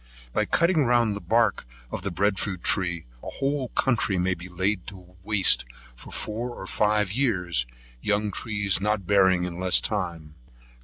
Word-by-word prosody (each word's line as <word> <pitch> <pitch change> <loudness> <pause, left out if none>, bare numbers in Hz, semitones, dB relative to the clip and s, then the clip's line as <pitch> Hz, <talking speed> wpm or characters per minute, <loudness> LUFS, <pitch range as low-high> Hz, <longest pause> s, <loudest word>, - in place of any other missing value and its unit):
By - - +1
cutting 170 -4 +3
round 120 -3 +2
the - - -4
bark 110 - +1 0.2
of - - -4
the 100 - -3
Bread 100 +2 0
fruit 95 -4 -3
tree, 85 -4 +1 0.2
a - - -6
whole 140 -1 -2
country 115 -7 0
may 90 +1 +1
be 90 +1 -9
laid 95 +3 0 0.4
waste 95 - +4 0.3
for - - -11
four 115 +3 -3
or - - -8
five 105 -2 +1
years, 90 - +1 0.3
young 105 0 0
trees 100 -2 0
not 105 -2 0
bearing 95 -2 +4
in 90 -1 -5
less 90 -1 +4
time. 85 -7 -3
100 Hz, 160 wpm, -25 LUFS, 90-110 Hz, 0.4 s, waste